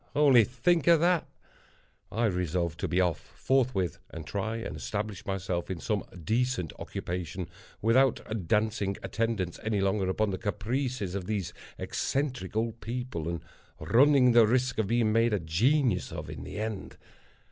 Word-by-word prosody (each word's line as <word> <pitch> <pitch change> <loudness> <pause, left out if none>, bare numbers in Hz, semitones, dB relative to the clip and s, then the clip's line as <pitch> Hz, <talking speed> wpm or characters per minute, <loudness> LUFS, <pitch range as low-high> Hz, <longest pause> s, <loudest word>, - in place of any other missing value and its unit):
—only 140 -6 +6
think 140 +8 +1
of 170 -2 +7
that! 175 0 +2 0.8
I 115 +2 +1
resolved 90 -4 -1
to - - -1
be 90 +3 +1
off 90 -4 +2
forthwith, 125 -9 0
and 80 -1 -8
try 100 +6 -2
and 115 -7 -5
establish 95 +7 -4
myself 95 -3 -2
in 95 -3 -3
some 105 +2 -1 0.2
decent 115 - 0
occupation, 90 0 -4 0.4
without 115 -5 +2
dancing 105 -2 +1
attendance 110 -6 -2
any 110 -2 0
longer 95 0 +1
upon 105 +2 +1
the 95 - -3
caprices 105 0 -2
of 95 -2 -4
these 100 -5 -2 0.2
eccentric 130 -9 -2
old 115 +1 -1
people, 120 -9 -4
and 85 -1 -3 0.4
running 130 0 +5
the 115 -2 +6
risk 125 0 +1
of 110 - +1
being 115 -1 +2
made 115 0 +3
a 105 - +2
genius 105 - +1
of - - -6
in - - -7
the - - -7
end. 110 -2 -4
110 Hz, 155 wpm, -29 LUFS, 95-125 Hz, 0.8 s, of